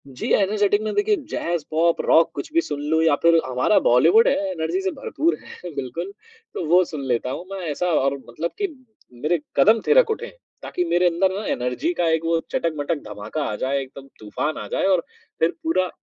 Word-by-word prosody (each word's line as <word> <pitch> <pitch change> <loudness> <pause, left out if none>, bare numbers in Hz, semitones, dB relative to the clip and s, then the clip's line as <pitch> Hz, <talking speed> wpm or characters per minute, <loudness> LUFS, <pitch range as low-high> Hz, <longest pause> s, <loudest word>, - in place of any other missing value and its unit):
जी, 130 -2 -6
energetic 205 +1 +2
में, 215 0 -3
देखिए, 420 +1 +2 0.2
jazz, 170 -2 -2
pop, 165 +2 +2
rock, 165 +1 +4
कुछ - - -6
भी 335 - +4
सुन 145 - -5
लूँ, 160 0 +3
या 160 -3 +4
फिर 170 0 +6
हमारा 130 +10 +2
बॉलीवुड 460 -1 +5
है, - - +3 0.2
एनर्जी 165 +1 -2
से 190 -1 -1
भरपूर 330 - -1
है, 180 - -10
बिल्कुल। 140 +8 -4 0.4
तो 175 - -4
वो 180 +2 +6
सुन 150 -4 -6
लेता 125 0 0
हूँ 175 - -6
मैं, 195 - -5
ऐसा 165 +5 -2
और 140 -5 +1
मतलब 155 +8 -4
कि 400 - +2 0.5
मेरे 150 +8 -1 0.2
कदम 225 +2 +6
थिरक 470 0 +5
उठें। 465 +2 -4 0.3
ताकि 360 - -2
मेरे 180 - +3
अंदर 180 +3 +1
ना, 215 - -6
एनर्जी 125 - -1
का 175 - 0
एक 160 0 0
वो 165 0 +2
चटक-मटक 160 -1 -1
धमाका 105 +8 -5
आ - - -3
जाए, 135 +5 -1
एकदम 135 +1 -11
तूफ़ान 130 +8 -3
आ - - -8
जाए, - - 0
और 185 -3 +3 0.4
फिर 165 - +3
पूरा 185 - +1
170 Hz, 200 wpm, -22 LUFS, 145-200 Hz, 0.5 s, फिर